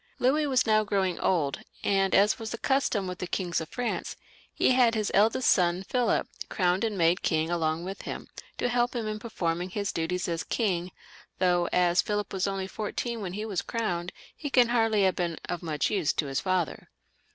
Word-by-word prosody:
Louis 290 Hz, +4 st, +2 dB
was 260 Hz, -2 st, +2 dB
now 215 Hz, -1 st, +4 dB
growing 195 Hz, -4 st, 0 dB
old, 150 Hz, -7 st, +1 dB, 0.2 s
and, 195 Hz, -1 st, +2 dB
as 205 Hz, +2 st, +4 dB
was 225 Hz, -1 st, -5 dB
the 230 Hz, -, -4 dB
custom 260 Hz, -6 st, +1 dB
with 180 Hz, -1 st, -5 dB
the 180 Hz, -, -3 dB
kings 175 Hz, -2 st, -1 dB
of 160 Hz, -, -7 dB
France, 245 Hz, -1 st, -3 dB, 0.4 s
he -, -, +2 dB
had 245 Hz, -2 st, +4 dB
his 215 Hz, -2 st, -1 dB
eldest 220 Hz, +5 st, +4 dB
son 180 Hz, 0 st, +2 dB
Philip 245 Hz, 0 st, +1 dB, 0.2 s
crowned 180 Hz, +2 st, +1 dB
and 220 Hz, -3 st, -1 dB
made 170 Hz, +1 st, +3 dB
king 160 Hz, 0 st, 0 dB
along 165 Hz, -1 st, 0 dB
with 190 Hz, +2 st, -6 dB
him, -, -, -6 dB, 0.3 s
to -, -, 0 dB
help 245 Hz, 0 st, +1 dB
him 235 Hz, -2 st, -2 dB
in 215 Hz, 0 st, -3 dB
performing 180 Hz, -5 st, -2 dB
his 200 Hz, +1 st, -2 dB
duties 180 Hz, +3 st, -2 dB
as 170 Hz, -1 st, -2 dB
king, 185 Hz, -6 st, -1 dB, 0.5 s
though, 175 Hz, -1 st, +2 dB
as 175 Hz, 0 st, +3 dB
Philip 210 Hz, -1 st, -2 dB
was 190 Hz, 0 st, 0 dB
only 195 Hz, -1 st, -2 dB
fourteen 220 Hz, +3 st, -4 dB
when 185 Hz, -3 st, -4 dB
he 210 Hz, +2 st, -4 dB
was 200 Hz, -5 st, -2 dB
crowned, 180 Hz, -7 st, -2 dB, 0.2 s
he 290 Hz, -, -5 dB
can 245 Hz, -3 st, +4 dB
hardly 225 Hz, -3 st, +3 dB
have 190 Hz, -1 st, +3 dB
been 170 Hz, -2 st, -1 dB
of 175 Hz, -1 st, -4 dB
much 155 Hz, -3 st, -1 dB
use 185 Hz, -8 st, +1 dB
to 155 Hz, -, -1 dB
his 135 Hz, 0 st, -1 dB
father. 185 Hz, -3 st, -1 dB
195 Hz, 200 wpm, -28 LUFS, 175-225 Hz, 0.5 s, now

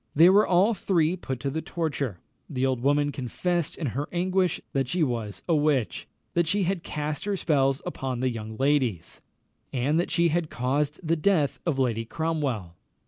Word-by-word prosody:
They 170 Hz, +5 st, +8 dB
were 205 Hz, +2 st, +5 dB
all 190 Hz, +5 st, +4 dB
three 175 Hz, -4 st, +1 dB
put 130 Hz, -8 st, -5 dB
to 140 Hz, -, -1 dB
the 160 Hz, +3 st, -2 dB
torture. 145 Hz, -, -2 dB, 0.3 s
The 130 Hz, +1 st, 0 dB
old 130 Hz, -2 st, 0 dB
woman 145 Hz, +2 st, +2 dB
confessed 155 Hz, +5 st, -2 dB
in 165 Hz, -, -3 dB
her 140 Hz, +3 st, -2 dB
anguish 180 Hz, 0 st, +1 dB
that 135 Hz, -2 st, 0 dB
she 175 Hz, -1 st, +1 dB
was 110 Hz, -8 st, -3 dB
a 170 Hz, -, +3 dB
witch; 145 Hz, -6 st, +1 dB, 0.3 s
that 170 Hz, -1 st, +2 dB
she 200 Hz, +4 st, +1 dB
had 185 Hz, 0 st, -1 dB
cast 150 Hz, 0 st, -4 dB
her 205 Hz, -1 st, 0 dB
spells 135 Hz, -5 st, +1 dB
upon 130 Hz, -2 st, -3 dB
the 130 Hz, 0 st, +1 dB
young 110 Hz, -1 st, -6 dB
ladies; 130 Hz, -, 0 dB, 0.5 s
and 140 Hz, +5 st, +1 dB
that 175 Hz, -, 0 dB
she 170 Hz, -1 st, +3 dB
had 165 Hz, 0 st, 0 dB
caused 145 Hz, +6 st, -1 dB
the 165 Hz, -, +3 dB
death 155 Hz, -3 st, +1 dB
of 155 Hz, -5 st, +1 dB
Lady 120 Hz, -4 st, +1 dB
Cromwell. 135 Hz, -, -2 dB
145 Hz, 185 wpm, -26 LUFS, 130-170 Hz, 0.5 s, They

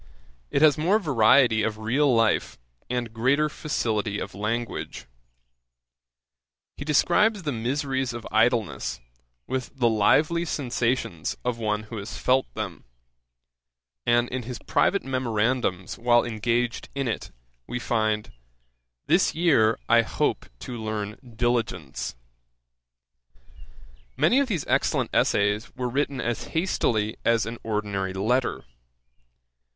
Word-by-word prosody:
It 145 Hz, -, +2 dB
has 150 Hz, -2 st, +5 dB
more 180 Hz, +7 st, +3 dB
variety 125 Hz, -, +4 dB
of 110 Hz, 0 st, -1 dB
real 130 Hz, +6 st, +2 dB
life, 115 Hz, -3 st, +2 dB, 0.3 s
and 120 Hz, -2 st, -2 dB
greater 135 Hz, +7 st, +2 dB
facility 110 Hz, -9 st, -2 dB
of -, -, -5 dB
language. 110 Hz, -, -3 dB, 1.7 s
He -, -, -6 dB
describes 190 Hz, +7 st, +3 dB
the 150 Hz, -, -1 dB
miseries 130 Hz, +2 st, -1 dB
of 120 Hz, -1 st, -7 dB
idleness, 110 Hz, -, +1 dB, 0.5 s
with 130 Hz, +1 st, -4 dB
the 120 Hz, -3 st, +3 dB
lively 150 Hz, +10 st, +3 dB
sensations 125 Hz, -, -2 dB
of 120 Hz, -2 st, -1 dB
one 105 Hz, -1 st, -1 dB
who 110 Hz, +1 st, -8 dB
has 100 Hz, +1 st, -6 dB
felt 130 Hz, +1 st, +1 dB
them; 105 Hz, -6 st, -5 dB, 1.2 s
and 120 Hz, 0 st, +3 dB
in 130 Hz, 0 st, -3 dB
his 125 Hz, 0 st, -6 dB
private 200 Hz, -, +2 dB
memorandums 120 Hz, -6 st, -1 dB
while 120 Hz, 0 st, +4 dB
engaged 120 Hz, +1 st, -1 dB
in 135 Hz, -2 st, -1 dB
it, 115 Hz, -, -3 dB, 0.4 s
we -, -, -3 dB
find 110 Hz, -3 st, -1 dB, 0.7 s
'This -, -, +3 dB
year 140 Hz, -10 st, +3 dB
I -, -, +6 dB
hope -, -, -1 dB
to 120 Hz, -3 st, -6 dB
learn 110 Hz, +2 st, -5 dB
diligence.' 115 Hz, -, -1 dB, 2.0 s
Many 260 Hz, -, +4 dB
of 280 Hz, -, +1 dB
these 180 Hz, -, -2 dB
excellent -, -, +1 dB
essays 105 Hz, +2 st, +1 dB
were 125 Hz, -1 st, -2 dB
written 140 Hz, +1 st, -1 dB
as 120 Hz, -2 st, -2 dB
hastily 110 Hz, -, 0 dB
as 115 Hz, -2 st, +2 dB
an 115 Hz, +1 st, -6 dB
ordinary 100 Hz, -3 st, -2 dB
letter. 110 Hz, +7 st, 0 dB
120 Hz, 120 wpm, -25 LUFS, 110-135 Hz, 2.0 s, I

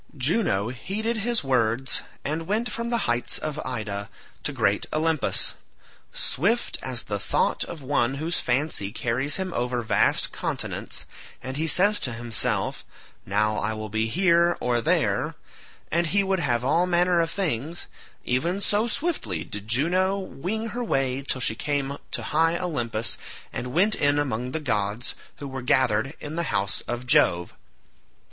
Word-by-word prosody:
Juno 125 Hz, -, +2 dB
heeded 215 Hz, -, -2 dB
his 230 Hz, -1 st, +1 dB
words 125 Hz, -1 st, +1 dB, 0.2 s
and 160 Hz, +3 st, -2 dB
went 220 Hz, +5 st, 0 dB
from 235 Hz, 0 st, -2 dB
the 235 Hz, -1 st, 0 dB
heights 120 Hz, 0 st, +1 dB
of 155 Hz, -1 st, -3 dB
Ida 105 Hz, -4 st, -3 dB, 0.3 s
to -, -, -2 dB
great -, -, +1 dB
Olympus. 160 Hz, -1 st, +1 dB, 0.6 s
Swift 220 Hz, -, 0 dB
as 125 Hz, -4 st, -3 dB
the 100 Hz, -1 st, -3 dB
thought -, -, +1 dB
of 160 Hz, -5 st, -8 dB
one 130 Hz, -2 st, +1 dB
whose 160 Hz, +5 st, 0 dB
fancy 130 Hz, -6 st, +1 dB
carries 125 Hz, +5 st, 0 dB
him 190 Hz, -2 st, -2 dB
over 125 Hz, 0 st, -1 dB
vast 110 Hz, -, +3 dB
continents, -, -, -3 dB, 0.4 s
and 130 Hz, +1 st, -4 dB
he 160 Hz, +3 st, 0 dB
says 205 Hz, +6 st, +4 dB
to 125 Hz, -, -1 dB
himself, 115 Hz, -1 st, -1 dB, 0.4 s
"Now 105 Hz, +2 st, +1 dB
I 110 Hz, +1 st, 0 dB
will 110 Hz, 0 st, -5 dB
be 110 Hz, +1 st, 0 dB
here, 170 Hz, +4 st, +3 dB
or 120 Hz, -1 st, +1 dB
there," -, -, +1 dB, 0.6 s
and 170 Hz, 0 st, +2 dB
he 200 Hz, +4 st, +3 dB
would 190 Hz, -1 st, +1 dB
have 120 Hz, -6 st, +1 dB
all 170 Hz, +6 st, +3 dB
manner 175 Hz, 0 st, +3 dB
of 165 Hz, -, 0 dB
things—even 165 Hz, -, -2 dB
so 210 Hz, +3 st, +2 dB
swiftly 220 Hz, -, -1 dB
did 105 Hz, +4 st, -7 dB
Juno 180 Hz, -, +2 dB
wing 200 Hz, +4 st, -3 dB
her 245 Hz, +3 st, -3 dB
way 135 Hz, -, +1 dB
till 135 Hz, -1 st, +1 dB
she 110 Hz, -, +2 dB
came 140 Hz, +2 st, -1 dB
to -, -, -2 dB
high 165 Hz, +2 st, +2 dB
Olympus 120 Hz, -10 st, -2 dB, 0.3 s
and 125 Hz, -, -3 dB
went 180 Hz, +11 st, +3 dB
in 145 Hz, -3 st, +3 dB
among 125 Hz, -4 st, -1 dB
the 160 Hz, -, -2 dB
gods 105 Hz, -4 st, -1 dB, 0.2 s
who 145 Hz, -, -7 dB
were 130 Hz, -1 st, -5 dB
gathered 125 Hz, +1 st, +2 dB
in 150 Hz, +2 st, -6 dB
the 170 Hz, -, +1 dB
house 100 Hz, 0 st, 0 dB
of 120 Hz, +1 st, -3 dB
Jove. 85 Hz, -7 st, +3 dB
140 Hz, 155 wpm, -26 LUFS, 120-175 Hz, 0.6 s, says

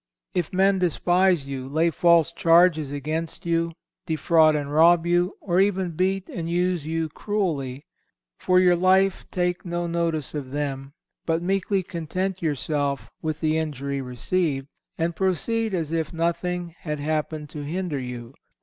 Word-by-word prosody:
If 175 Hz, -4 st, -1 dB
men 195 Hz, +1 st, +3 dB
despise 180 Hz, -1 st, +2 dB
you, 135 Hz, -1 st, -5 dB
lay 160 Hz, +4 st, +2 dB
false 170 Hz, -1 st, +4 dB
charges 165 Hz, -3 st, +4 dB
against 155 Hz, +4 st, -4 dB
you, 170 Hz, 0 st, +1 dB, 0.4 s
defraud 160 Hz, -1 st, +4 dB
and 145 Hz, -1 st, -3 dB
rob 165 Hz, +2 st, +5 dB
you, 175 Hz, +2 st, +1 dB
or 180 Hz, -1 st, +2 dB
even 190 Hz, -3 st, +1 dB
beat 190 Hz, +3 st, 0 dB
and 165 Hz, -1 st, -5 dB
use 175 Hz, -2 st, 0 dB
you 165 Hz, 0 st, -1 dB
cruelly, 150 Hz, -8 st, -3 dB, 0.5 s
for 185 Hz, 0 st, +3 dB
your 180 Hz, -1 st, +5 dB
life 190 Hz, +2 st, +3 dB
take 180 Hz, -1 st, -1 dB
no 175 Hz, -1 st, -3 dB
notice 170 Hz, -3 st, -1 dB
of 145 Hz, -4 st, -5 dB
them, 140 Hz, -1 st, -4 dB, 0.3 s
but 165 Hz, +1 st, +1 dB
meekly 195 Hz, +1 st, 0 dB
content 180 Hz, +3 st, -3 dB
yourself 145 Hz, -4 st, -1 dB
with 155 Hz, -1 st, -3 dB
the 160 Hz, 0 st, +2 dB
injury 140 Hz, -3 st, -3 dB
received, 135 Hz, +3 st, -1 dB, 0.3 s
and 165 Hz, +1 st, -1 dB
proceed 220 Hz, +5 st, 0 dB
as 160 Hz, -3 st, -2 dB
if 160 Hz, -2 st, -1 dB
nothing 170 Hz, +1 st, -2 dB
had 150 Hz, -2 st, -4 dB
happened 155 Hz, 0 st, -2 dB
to 150 Hz, -, -6 dB
hinder 165 Hz, -1 st, -3 dB
you. 125 Hz, -1 st, -7 dB
165 Hz, 150 wpm, -24 LUFS, 150-180 Hz, 0.5 s, rob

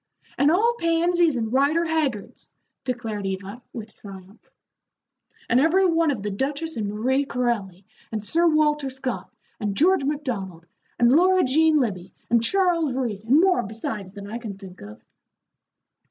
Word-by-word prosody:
"And 280 Hz, -, +3 dB
all 455 Hz, +8 st, +2 dB
Pansy's 335 Hz, -1 st, +2 dB
and 225 Hz, -1 st, -2 dB
Rider 290 Hz, +6 st, +2 dB
Haggard's," 300 Hz, -10 st, -3 dB, 0.4 s
declared 225 Hz, -6 st, -3 dB
Eva, 195 Hz, +5 st, -6 dB
with 220 Hz, -2 st, -9 dB
triumph. 195 Hz, +1 st, -13 dB, 1.0 s
"And 240 Hz, -, +3 dB
every 340 Hz, +7 st, +3 dB
one 330 Hz, -2 st, +2 dB
of 245 Hz, -8 st, -2 dB
The 210 Hz, -, -3 dB
Duchess 285 Hz, +9 st, -3 dB
and 215 Hz, -3 st, -2 dB
Marie 255 Hz, +7 st, 0 dB
Corelli, 230 Hz, -8 st, -2 dB, 0.3 s
and 215 Hz, -2 st, -3 dB
Sir 335 Hz, +10 st, +2 dB
Walter 300 Hz, -3 st, +2 dB
Scott, 260 Hz, -1 st, -5 dB, 0.3 s
and 205 Hz, -2 st, -3 dB
George 365 Hz, 0 st, +4 dB
Macdonald, 230 Hz, -, -4 dB, 0.3 s
and 240 Hz, 0 st, +4 dB
Laura 370 Hz, +2 st, +4 dB
Jean 315 Hz, +4 st, +3 dB
Libbey, 190 Hz, -9 st, -3 dB, 0.2 s
and 235 Hz, -1 st, +3 dB
Charles 340 Hz, -2 st, +2 dB
Reade, 225 Hz, -6 st, -3 dB
and 265 Hz, +7 st, +5 dB
more, 370 Hz, -1 st, +3 dB
besides, 210 Hz, -2 st, -6 dB
than 200 Hz, -1 st, -9 dB
I 225 Hz, +3 st, -5 dB
can 215 Hz, -5 st, -7 dB
think 190 Hz, -2 st, -12 dB
of." 105 Hz, +1 st, -12 dB
255 Hz, 155 wpm, -24 LUFS, 210-320 Hz, 1.0 s, and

